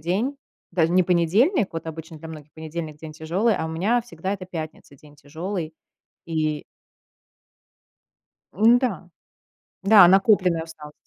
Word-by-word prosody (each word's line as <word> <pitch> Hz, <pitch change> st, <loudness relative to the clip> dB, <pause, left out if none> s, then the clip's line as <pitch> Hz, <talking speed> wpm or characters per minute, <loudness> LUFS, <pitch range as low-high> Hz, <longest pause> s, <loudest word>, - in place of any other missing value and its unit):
день. 200 Hz, -, -1 dB, 0.3 s
Даже 170 Hz, -1 st, +1 dB
не 185 Hz, +1 st, +5 dB
понедельник, 190 Hz, -, +2 dB
вот 165 Hz, 0 st, -6 dB
обычно 160 Hz, 0 st, -8 dB
для 160 Hz, +1 st, -10 dB
многих 150 Hz, -2 st, -11 dB
понедельник- 160 Hz, -1 st, -7 dB
день 155 Hz, 0 st, -9 dB
тяжёлый, 175 Hz, +9 st, 0 dB
а 160 Hz, -, -3 dB
у -, -, -5 dB
меня 195 Hz, +10 st, +1 dB
всегда 190 Hz, -4 st, -5 dB
это 195 Hz, -2 st, -5 dB
пятница- 155 Hz, -4 st, -8 dB
день 150 Hz, +1 st, -19 dB
тяжёлый, 160 Hz, +3 st, -6 dB, 0.5 s
и 155 Hz, -2 st, -2 dB, 1.9 s
Ну 225 Hz, -, +5 dB
да, 205 Hz, -9 st, -3 dB, 0.8 s
да, 200 Hz, -2 st, +8 dB
накопленная 190 Hz, -3 st, +3 dB
усталость. 155 Hz, -2 st, -12 dB
170 Hz, 135 wpm, -23 LUFS, 160-195 Hz, 1.9 s, да